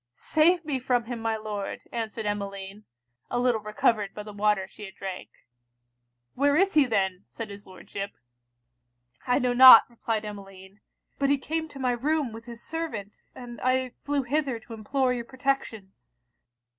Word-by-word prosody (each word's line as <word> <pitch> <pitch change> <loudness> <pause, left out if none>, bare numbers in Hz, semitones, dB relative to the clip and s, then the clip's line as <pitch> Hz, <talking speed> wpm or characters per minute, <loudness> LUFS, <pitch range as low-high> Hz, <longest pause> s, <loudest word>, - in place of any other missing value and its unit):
'Save 335 +2 +2
me 285 -4 -1
from 250 -1 +1
him 235 0 -6
my 225 0 -1
Lord!' 210 -2 -5
answered 225 -1 -4
Emmeline, 200 0 -5 0.4
a 245 - -1
little 245 -3 +2
recovered 210 -1 0
by 210 - -6
the 210 0 -10
water 205 -2 +1
she 210 +2 -11
had 190 - -11
drank. 190 -2 -6 1.0
'Where 285 +2 +2
is 390 +4 +3
he 300 -3 +5
then?' 195 -5 -1
said 225 -3 -7
his 200 0 -11
Lordship. 195 +1 -7 1.2
'I 250 - +3
know 250 0 +1
not,' 255 -2 +10
replied 225 -2 -3
Emmeline; 195 -1 -10 0.4
'but 275 -1 +2
he 285 - +4
came 320 +4 -3
to 285 - -13
my 255 -1 +1
room 280 +2 0
with 225 +1 -10
his 235 -1 -10
servant, 270 -12 -5 0.2
and 240 -2 -9
I 255 0 +1
flew 285 -1 0
hither 270 -2 -1
to 230 - -11
implore 250 +4 0
your 240 -1 -3
protection.' 260 -7 -2
230 Hz, 165 wpm, -27 LUFS, 205-265 Hz, 1.2 s, not